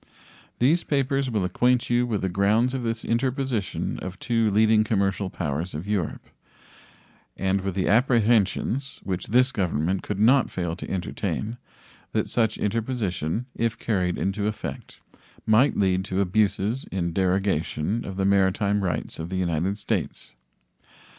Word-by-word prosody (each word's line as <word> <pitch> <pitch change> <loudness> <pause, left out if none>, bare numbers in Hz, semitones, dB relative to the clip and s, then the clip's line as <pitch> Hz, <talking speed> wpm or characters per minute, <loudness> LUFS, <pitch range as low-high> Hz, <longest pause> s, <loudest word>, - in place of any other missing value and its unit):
These 150 +8 +3
papers 135 -1 0
will 105 -6 0
acquaint 125 +7 +2
you 120 0 +3
with 110 -5 -2
the - - +2
grounds 105 +7 +2
of 130 - -2
this 115 -1 -3
interposition 125 -2 -1
of 95 0 -6
two 115 0 +1
leading 110 +1 +4
commercial 100 -3 0
powers 80 0 -3
of 80 +6 -5
Europe, 100 -6 -2 1.1
and 95 0 0
with 95 -1 -3
the 95 - 0
apprehensions, 120 +2 +2
which 90 -2 -3
this 125 +4 +3
Government 90 - 0
could 105 -2 -4
not 125 +5 +4
fail 85 -3 -3
to - - -7
entertain, 105 +4 -3 0.6
that - - 0
such 110 -2 +1
interposition, 110 - -2
if 115 -1 -1
carried 90 -7 0
into 100 +2 -1
effect, 105 - -6 0.5
might 110 +6 +4
lead 95 -1 +2
to 95 -1 -2
abuses 105 +5 +1
in 85 -3 -3
derogation 95 +1 0
of 95 -1 -7
the 95 - +1
maritime 100 +1 +2
rights 85 -4 -3
of 80 +1 -5
the 95 - -3
United 90 +2 0
States. - - -3
100 Hz, 145 wpm, -25 LUFS, 95-115 Hz, 1.1 s, leading